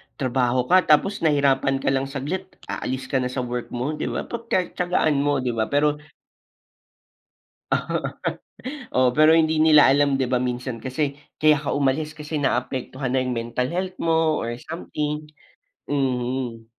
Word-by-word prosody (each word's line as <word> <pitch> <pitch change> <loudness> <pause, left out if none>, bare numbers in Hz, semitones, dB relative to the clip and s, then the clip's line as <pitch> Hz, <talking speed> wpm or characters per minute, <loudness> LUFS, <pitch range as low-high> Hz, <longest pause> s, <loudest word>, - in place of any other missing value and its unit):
trabaho 125 -1 +1
ka 185 0 +5
tapos 175 +7 +3
nahirapan 140 -3 +2
ka - - +2
lang 135 0 0
saglit 150 +8 -4 0.2
aalis 130 0 -4
ka 135 - +2
na 125 - -1
sa 130 -1 -2
work 120 0 -4
mo 125 +5 -1
'di 155 - -3
ba, - - -2
pag 235 -1 -7
tiya-tiyagaan 180 -5 +1
mo 140 -2 +1
'di 125 - 0
ba, 110 -2 -1
pero 150 +1 +1 1.7
Oo, - - 0 1.0
Oo, 130 0 +5
pero 155 +1 +7
hindi 160 -1 +3
nila 155 -2 +6
alam 140 0 +3
'di 130 - +2
ba 125 - +1
minsan 125 0 -2
kasi 140 +2 -2 0.2
kaya 155 -1 +5
ka - - -1
umalis 145 +2 0
kasi 155 0 -6
naapektuhan 130 -1 -2
na 130 - +1
yung 125 - -2
mental 120 +2 -2
health 185 +1 -3
mo 160 -1 +2
or 115 - -3
something, 150 -2 -4 0.6
mhm. 125 -4 -2
140 Hz, 155 wpm, -23 LUFS, 130-155 Hz, 1.7 s, pero